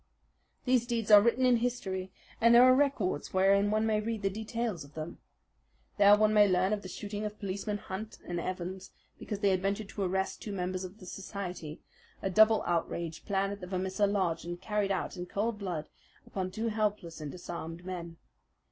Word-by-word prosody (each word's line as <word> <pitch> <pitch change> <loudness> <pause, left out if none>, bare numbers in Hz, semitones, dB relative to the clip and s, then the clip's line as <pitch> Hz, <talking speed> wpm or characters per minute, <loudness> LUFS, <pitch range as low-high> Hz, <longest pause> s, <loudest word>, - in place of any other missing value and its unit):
These 250 -2 +3
deeds 230 -3 -1
are 205 -1 +10
written 235 +4 +3
in 250 -1 +5
history, 195 -6 -2 0.3
and 230 +1 +6
there 240 - +9
are 255 0 +8
records 255 - 0
wherein 200 +2 +4
one 215 +1 +1
may 215 -1 +2
read 220 -1 -3
the 195 - +1
details 220 -4 -3
of 140 +1 -16
them. 160 +2 -6 0.8
There 205 0 +8
one 215 0 +3
may 210 -1 +6
learn 185 +2 +2
of 210 - -2
the 185 - -8
shooting 205 +2 -5
of 210 0 -4
Policemen 200 +1 -3
Hunt 210 +2 -7
and 175 -1 -2
Evans 185 +2 -5 0.3
because 205 -1 -5
they 200 -2 +4
had 185 -1 +1
ventured 200 +1 -2
to 205 - -6
arrest 190 0 -1
two 210 - -5
members 185 0 -2
of 185 +2 -8
the 185 - -13
society 180 -4 -6 0.4
a 195 - -2
double 220 +3 +6
outrage 170 -1 -2
planned 195 0 0
at 200 - -9
the 180 - -6
Vermissa 190 +2 0
lodge 185 -5 0
and 175 0 -5
carried 210 -1 -1
out 195 - -2
in 180 0 -5
cold 210 +3 -2
blood 175 -6 -4 0.4
upon 185 -1 -3
two 220 +5 -2
helpless 210 -7 -2
and 150 -2 -5
disarmed 170 -1 -7
men. 170 -3 -6
195 Hz, 195 wpm, -31 LUFS, 180-215 Hz, 0.8 s, are